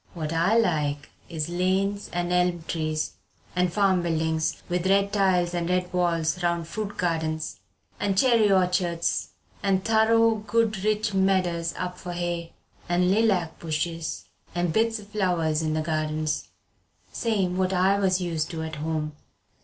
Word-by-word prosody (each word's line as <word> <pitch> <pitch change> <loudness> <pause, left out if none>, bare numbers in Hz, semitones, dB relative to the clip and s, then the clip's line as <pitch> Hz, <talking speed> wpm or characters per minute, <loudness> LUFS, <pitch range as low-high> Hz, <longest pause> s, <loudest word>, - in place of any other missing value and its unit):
What 160 -1 -3
I 170 +7 +3
like 150 -9 0 0.2
is 160 -2 -3
lanes 190 +3 0
an' 175 0 -2
elm 180 -1 +1
trees 155 -2 -2 0.4
and 180 -1 +2
farm 190 -1 +3
buildings 160 -1 -1
with 180 +1 -1
red 200 +1 +3
tiles 185 -3 +2
and 175 0 -1
red 180 0 0
walls 175 -1 +1
round 170 -1 0
fruit 205 +3 -5
gardens 160 -2 -2 0.4
and 195 -1 0
cherry 230 -3 +4
orchards 180 -2 +1 0.3
and 190 -1 +1
thorough 225 0 +4
good 220 -3 +1
rich 215 0 +1
medders 185 -3 +1
up 180 0 -4
for 175 -1 -6
hay, 175 -1 -3 0.4
and 180 +1 +3
lilac 195 -6 +1
bushes 165 0 -3 0.3
and 175 -2 0
bits 225 +2 +2
o' - - -10
flowers 180 -7 0
in 155 -1 -1
the 155 - 0
gardens, 155 -1 -1 0.6
same 195 - 0
what 185 0 +1
I 190 +2 +3
was 190 -2 +2
used 165 -4 -2
to 160 -1 -4
at 160 -1 -5
home." 155 0 -2
180 Hz, 150 wpm, -26 LUFS, 165-195 Hz, 0.6 s, cherry